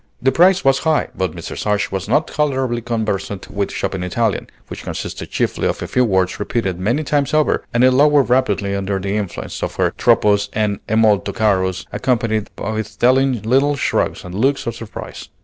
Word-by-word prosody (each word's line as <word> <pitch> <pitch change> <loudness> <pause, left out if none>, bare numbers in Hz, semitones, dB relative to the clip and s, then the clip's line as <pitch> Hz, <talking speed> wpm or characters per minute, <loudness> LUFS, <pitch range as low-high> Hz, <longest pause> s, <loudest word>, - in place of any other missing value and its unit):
The 135 +2 +2
price 180 +5 +4
was 135 0 +4
high; 160 -1 +1
but 95 -4 -2
Mrs. - - -6
Ashe 105 -1 0
was 95 +1 -4
now 135 - +4
tolerably 135 -6 -1
conversant 105 -4 -3
with 100 0 -2
shopping 95 - -3
Italian, 105 +4 -1 0.2
which - - -8
consists - - -5
chiefly - - -1
of - - -2
a - - -4
few 125 - +2
words 95 -5 +1
repeated 100 -4 -2
many 120 +11 0
times 145 0 0
over, 155 -1 +2
and 120 +1 +2
it 130 - +6
lowered 145 +1 +4
rapidly 105 -6 +1
under 100 0 -1
the 100 +1 -2
influence 105 -4 -4
of - - -3
her - - +1
troppo's 100 -1 +3
and 105 -2 0
è 110 - +1
molto 105 -3 +3
caro's, 95 -3 0
accompanied 115 -4 0
with 110 +1 -4
telling 130 -1 +3
little 135 +6 +2
shrugs - - -1
and 90 - -9
looks 135 +8 +1
of 115 - -2
surprise. 115 -2 -8
110 Hz, 185 wpm, -19 LUFS, 100-130 Hz, 0.2 s, it